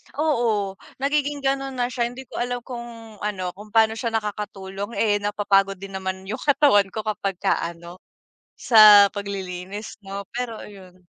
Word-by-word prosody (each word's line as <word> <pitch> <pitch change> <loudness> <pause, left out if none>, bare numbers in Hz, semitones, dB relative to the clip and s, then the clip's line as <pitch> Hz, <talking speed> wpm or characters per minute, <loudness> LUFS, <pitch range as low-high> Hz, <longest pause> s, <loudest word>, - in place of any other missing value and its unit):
Oo, 230 -10 0 0.2
nagiging 285 0 0
gano'n 270 0 -1
na 245 0 -1
siya, 235 -1 0
hindi 245 +2 -9
ko - - -8
alam 245 0 -2
kung 235 -3 -9
ano, 185 -4 -3
kung 205 +4 -13
paano 220 -1 +5
siya 225 +2 -4
nakakatulong, 205 -1 -4
eh, 205 -2 +2
napapagod 200 -1 +1
din 195 +1 -10
naman 190 0 -4
'yung 205 +3 -5
katawan 275 -9 +4
ko 215 +2 -5
kapagka 200 -3 -1
ano, 170 +1 -7 0.6
sa 210 -3 +8
paglilinis 200 0 -6
'no, 200 0 -7
pero 240 -2 -3
ayun. 185 -3 -13
210 Hz, 150 wpm, -23 LUFS, 195-240 Hz, 0.6 s, sa